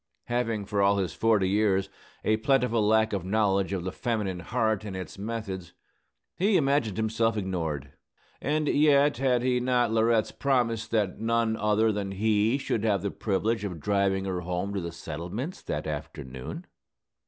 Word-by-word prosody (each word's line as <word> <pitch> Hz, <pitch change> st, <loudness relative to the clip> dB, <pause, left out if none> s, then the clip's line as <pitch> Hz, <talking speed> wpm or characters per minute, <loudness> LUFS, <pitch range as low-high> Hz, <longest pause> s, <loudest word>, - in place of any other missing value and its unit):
Having, 115 Hz, -4 st, -1 dB
for 100 Hz, 0 st, 0 dB
all 100 Hz, 0 st, +4 dB
his 95 Hz, -3 st, -1 dB
forty 110 Hz, -4 st, +2 dB
years, 100 Hz, -1 st, +2 dB, 0.4 s
a 110 Hz, 0 st, +3 dB
plentiful 125 Hz, -2 st, +2 dB
lack 110 Hz, +1 st, +3 dB
of 95 Hz, -3 st, -1 dB
knowledge 100 Hz, -1 st, +1 dB
of 95 Hz, -3 st, -2 dB
the 95 Hz, -, -3 dB
feminine 105 Hz, -5 st, -2 dB
heart 110 Hz, +3 st, 0 dB
and 100 Hz, -3 st, -6 dB
its 95 Hz, +1 st, -7 dB
methods, 100 Hz, -5 st, -5 dB, 0.6 s
he 195 Hz, +1 st, +3 dB
imagined 140 Hz, -, +1 dB
himself 110 Hz, 0 st, +1 dB
ignored. 80 Hz, -9 st, -3 dB, 0.5 s
And 150 Hz, +1 st, 0 dB
yet 145 Hz, -1 st, +4 dB
had 125 Hz, -2 st, +2 dB
he 125 Hz, -1 st, +2 dB
not 125 Hz, -2 st, +2 dB
Laurette's 115 Hz, 0 st, +2 dB
promise 120 Hz, -5 st, 0 dB
that 105 Hz, -4 st, 0 dB
none 115 Hz, 0 st, +1 dB
other 110 Hz, +1 st, +2 dB
than 100 Hz, -2 st, -3 dB
he 110 Hz, +4 st, +2 dB
should 115 Hz, -5 st, -2 dB
have 100 Hz, -5 st, +1 dB
the 100 Hz, -, -1 dB
privilege 110 Hz, +2 st, -1 dB
of 90 Hz, -5 st, -4 dB
driving 95 Hz, +2 st, +1 dB
her 90 Hz, -2 st, -2 dB
home 90 Hz, +3 st, -3 dB
to 100 Hz, -, -2 dB
the 85 Hz, 0 st, -4 dB
settlements 85 Hz, -, -6 dB
that 75 Hz, -, -4 dB
afternoon? 70 Hz, -4 st, -6 dB
105 Hz, 165 wpm, -27 LUFS, 95-115 Hz, 0.6 s, all